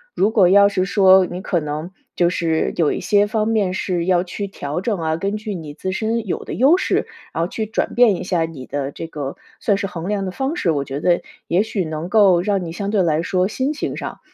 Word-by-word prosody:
如 200 - +3
果 200 -5 +4
要 200 +1 +6
是 185 -2 0
说 190 -1 +5
你 180 +1 -6
可 180 - 0
能 150 +2 -4 0.3
就 175 -1 +3
是 165 -3 0
有 160 -4 +2
一 - - -2
些 205 -1 +3
方 215 +1 -1
面 210 -5 +1
是 180 -2 -1
要 180 -1 +3
去 200 +2 -5
调 150 -4 -4
整 205 -3 -1
啊， 160 -1 -1
根 200 +4 -2
据 210 -2 -5
你 155 -4 -7
自 185 +5 -4
身 220 +2 -2
有 - - -2
的 - - -6
优 280 +9 +5
势， - - 0 0.3
然 165 - -1
后 - - -1
去 220 +4 -3
转 220 - -2
变 235 -6 +5
一 - - -5
下 175 -3 0
你 150 -6 -9
的 140 -1 -3
这 165 - -7
个 145 -4 -5 0.2
算 205 -3 +1
是 195 - -2
衡 175 -1 -6
量 200 -2 -1
的 185 - -3
方 270 - -2
式， 180 - 0
我 145 -3 +1
觉 140 +1 -5
得 175 +2 +2 0.3
也 180 +4 +2
许 215 -4 -2
能 155 +1 -4
够 195 -4 +5
让 195 0 0
你 165 - -5
相 200 +4 -3
对 210 -3 +2
来 160 -2 +1
说 185 +1 +1
心 260 +7 -1
情 310 - -4
上， - - -6
185 Hz, 270 characters per minute, -20 LUFS, 165-205 Hz, 0.3 s, 要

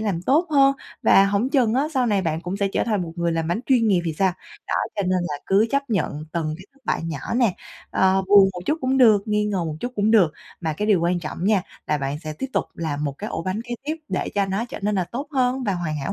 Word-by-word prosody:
làm 200 -6 -2
tốt 305 - +3
hơn, 275 -2 +5 0.3
và 195 - +6
hổng 200 +5 +1
chừng 250 -5 +2
á 275 +3 +2
sau 255 -2 +2
này 205 -3 +1
bạn 160 -2 -1
cũng 180 +3 -4
sẽ 200 -1 0
trở - - -1
thành 210 -5 0
một 165 -1 -6
người 170 -1 0
làm 165 -1 -1
bánh 175 +6 0
chuyên 245 -4 +3
nghiệp 190 -4 +3
thì 165 - -1
sao? 190 -2 +3 0.3
Đó, - - -2 0.2
cho 200 - 0
nên 185 0 +1
là 145 - -4
cứ 200 +3 +4
chấp 275 -2 -1
nhận 155 -6 -1
từng 155 -2 -2
cái 185 - -13
thất 275 - -28
bại - - 0
nhỏ 160 -4 -4 0.2
nè, 235 -7 +2 0.4
ờ, 190 0 +3
buồn 200 -1 +7
một 180 - -7
chút 310 +2 +1
cũng 260 +1 +1
được, 220 -6 +6
nghi 210 0 +1
ngờ 195 -4 -1
một 155 -2 -4
chút 245 - -4
cũng 210 +1 +2
được. 190 -9 +5 0.3
Mà 160 -3 -1
cái 205 +8 -3
điều 200 -5 +4
quan 175 +1 +1
trọng 165 +2 -5
nha, 200 -2 +3 0.2
là 150 - +1
bạn 140 +1 -3
sẽ 155 -2 -5
tiếp 265 - -4
tục - - +1
làm 150 -3 -3
một 140 - -1
cái 210 - -5
ổ 165 - -3
bánh 185 +4 -2
kế 240 0 -4
tiếp 310 +2 -2
để - - -2
cho 200 -1 +2
nó 195 +4 -1
trở 245 - -8
nên 210 +1 0
là 185 -2 +1
tốt 270 - -6
hơn 255 -1 +1
và 200 -4 0
hoàn 165 -3 -3
hảo 135 - -3
195 Hz, 285 wpm, -23 LUFS, 170-235 Hz, 0.4 s, buồn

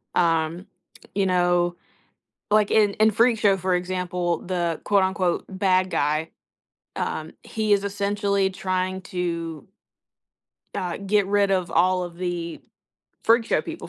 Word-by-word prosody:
um 165 +1 +1 0.5
you 200 -1 +2
know, 175 -1 +2 0.8
like 210 -1 +4
in 210 -2 +4
in 220 0 +4
Freak 230 +2 +3
Show, 200 -2 +4
for 185 0 0
example, 180 -1 -1
the 175 -3 -1
quote, 200 -2 +3
unquote 190 -2 0
,"Bad 185 -1 +1
guy," 155 +1 0 0.7
um, - - -3
he 215 -1 -1
is 200 -1 +4
essentially 200 -1 0
trying 185 0 -2
to 170 -4 -4 1.1
uh, 180 -2 -2
get 200 0 +1
rid 200 0 +2
of 185 -2 0
all 185 +2 +3
of 175 -1 -8
the 175 -2 -4 0.6
Freak 230 +1 +4
Show - - +1
people 330 0 -8
185 Hz, 135 wpm, -24 LUFS, 175-200 Hz, 1.1 s, like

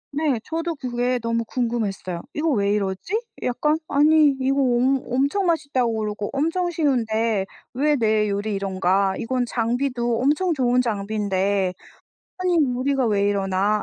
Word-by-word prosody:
네. 290 -5 +1
저도 330 +1 -3
그게 250 -2 -1
너무 230 0 0
궁금했어요. 220 -7 -3
'이거 315 +2 0
왜 200 -6 +1
이러지? 200 - -1 0.2
약간 300 +5 0
아니 295 0 +4
이거 270 +1 +1
엄 255 +1 +2
엄청 280 +10 +1
맛있다고 280 -8 0
그러고 210 -1 -3
엄청 330 +6 0
쉬운데 230 - 0 0.3
왜 295 +4 +2
내 215 -4 +2
요리 205 +2 -2
이런가. 190 0 +1
이건 250 +1 -1
장비도 240 0 -1
엄청 305 +7 +2
좋은 250 -3 +2
장비인데 200 -3 -1 0.7
아니 365 -1 +1 0.2
우리가 265 0 0
왜 205 -2 +2
이러나. 200 +1 +1
240 Hz, 295 characters per minute, -23 LUFS, 205-280 Hz, 0.7 s, 아니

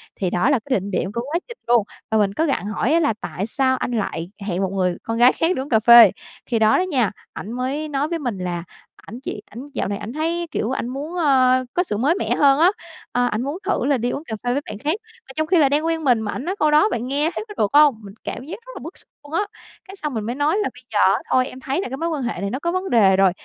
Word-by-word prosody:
thì 185 -3 -1
đó 200 +11 +1
là 275 -5 +3
cái 260 -7 +1
đỉnh 200 +2 -7
điểm 185 +1 -1
của 235 - -2
quá 300 +7 -2
trình 475 0 -10
luôn. 235 -3 +4 0.3
Và 220 - +3
mình 200 -2 +2
có 320 - +1
gặng 275 -8 -1
hỏi 225 +7 0
á 335 - +4
là 295 -8 +2
"Tại 195 - -4
sao 260 +2 +1
anh - - -3
lại 195 -5 -3 0.2
hẹn 185 0 -1
một 190 - 0
người 180 -2 0
con 225 0 -3
gái 245 +2 +7
khác 330 +3 +1
đi - - -2
uống 275 - -7
cà 220 -3 +4
phê?" 235 -2 +9 0.3
Khi 230 -3 0
đó 220 0 +4
đó 365 - +2
nha, 250 - +1 0.2
ảnh 215 - -7
mới 265 +5 -2
nói 285 +1 -1
với 335 -1 -2
mình 245 -8 -3
là 175 -2 -3 0.4
ảnh 230 +5 -9
chỉ 210 - -5
ảnh 245 +6 -8
dạo - - -1
này 200 0 -2
ảnh 215 +4 -7
thấy, 335 +2 -1
kiểu, 235 - -1
ảnh 245 - -2
muốn, 290 +7 -5
ơ, 255 -5 +3
có 355 - +2
sự 210 - -3
mới 290 +9 +2
mẻ - - -1
hơn 280 0 +4
á, 350 +3 +6 0.4
ờ, 245 0 +1
ảnh 215 +3 -1
muốn 285 +6 -3
thử 385 -10 0
là 280 -2 +2
đi 240 +1 -1
uống 290 - -4
cà 220 - -5
phê 245 0 0
với 285 - 0
bạn - - -6
khác. 295 +8 -1 0.3
Mà - - -23
trong 315 0 -1
khi 360 - +3
là 285 -4 +5
đang 300 +3 +1
quen 325 -1 -1
mình 245 -5 +3
mà 210 - -3
ảnh 265 - -5
nói 370 - -2
câu 305 - +3
đó 305 +8 +5
bạn 240 - -3
nghe 290 +4 +1
thấy 430 - -4
có 415 - -9
được 200 - +1
hông? 295 -4 +6
Mình 200 -1 -11
cảm - - -5
giác 330 - -6
rất - - -10
là - - -6
bức - - -9
xúc - - -15 0.2
luôn 290 - -13
á, 335 - +2 0.5
cái 385 0 -11
xong 300 -7 -4
mình 220 -2 -2
mới 240 +2 -3
nói 295 +7 +1
là 415 - 0
"Bây 250 - -16
giờ 205 - +2
á - - 0
thôi 255 0 +3
em 255 - -10
thấy 270 +7 -2
là - - -5
cái 265 - -5
mối 335 +2 -2
quan 295 -5 -2
hệ 220 -6 -3
này 200 - -2
nó 260 +6 -3
có 340 - -1
vấn 370 +1 -2
đề 200 -5 +5
rồi 195 -2 +5
260 Hz, 305 wpm, -21 LUFS, 220-305 Hz, 0.5 s, phê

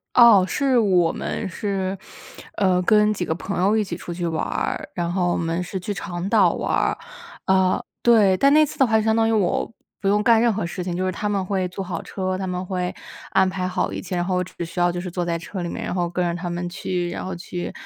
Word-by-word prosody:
哦， 230 -6 +8
是 265 +3 +1
我 180 -6 +3
们 200 - -4
是， 195 0 -2 0.6
呃 185 -2 +2
跟 210 +2 +4
几 180 - -2
个 160 - -1
朋 190 +3 -4
友 200 +3 +3
一 220 - +3
起 190 -4 -5
出 175 - -7
去 175 0 -3
玩 160 -1 -1
儿， - - -3
然 170 -1 -2
后 175 -1 +1
我 - - 0
们 165 +1 -1
是 190 +1 -5
去 205 +3 -4
长 175 0 -4
岛 200 -6 +4
玩 - - -3
儿 - - +1 0.5
嗯， 190 -1 +3 0.2
对。 215 -5 +5
但 275 +7 +4
那 305 +1 +6
次 - - -10
的 270 - +5
话 220 -1 +3
就 - - +1
相 220 0 +2
当 225 0 +3
于 225 - +2
我 210 +1 0 0.3
不 195 - +1
用 205 +1 +3
干 230 0 +5
任 235 - +3
何 200 -4 -2
事 175 +1 -5
情， 180 - -3
就 185 +1 -1
是 185 - 0
他 210 +4 -2
们 200 -2 0
会 190 -1 0
租 185 +2 -5
好 180 -2 -5
车， 185 -1 -3
他 190 0 -4
们 180 0 -3
会 180 -1 -2 0.4
安 190 -1 +3
排 185 -1 -2
好 185 +1 -1
一 - - -5
切， 185 - -5
然 175 - 0
后 180 +1 -1
我 180 - 0
只 175 - -8
需 170 - -9
要 175 0 +3
就 175 - -4
是 180 0 -5
坐 175 0 -2
在 170 -1 -1
车 180 +2 -6
里 175 - -3
面， - - -5
然 - - -3
后 175 -2 -1
跟 180 +1 -1
着 170 +1 -3
他 175 0 -4
们 175 +1 -3
去， 175 0 -3
然 - - -5
后 185 -1 -4
去 175 0 -6
185 Hz, 285 characters per minute, -23 LUFS, 175-205 Hz, 0.6 s, 哦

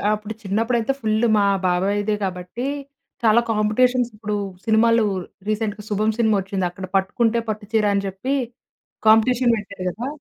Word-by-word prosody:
అప్పుడు 215 +1 -7
చిన్నప్పుడైతే 225 +5 0
ఫుల్ 220 +1 +1
మా 200 - +3 0.2
బాబాయ్‌దే 200 +4 +1
కాబట్టి 180 +7 -5 0.6
చాలా 225 +1 +5
కాంపిటీషన్స్ 240 +3 +2
ఇప్పుడు 210 -1 -3 0.3
సినిమాలు 230 +1 +4 0.5
రీసెంట్‍గా 210 -1 -2
'శుభం' 215 +1 0
సినిమా 220 -2 +3
వచ్చింది. 190 -1 -2
అక్కడ 185 +2 -7
పట్టుకుంటే 225 +4 +2
పట్టుచీర 215 0 -1
అని 200 0 0
చెప్పి 195 +9 -3 0.7
కాంపిటీషన్ 235 +2 +5
పెట్టారు 200 -2 -7
కదా! 235 +8 -5
215 Hz, 130 wpm, -22 LUFS, 200-230 Hz, 0.7 s, చాలా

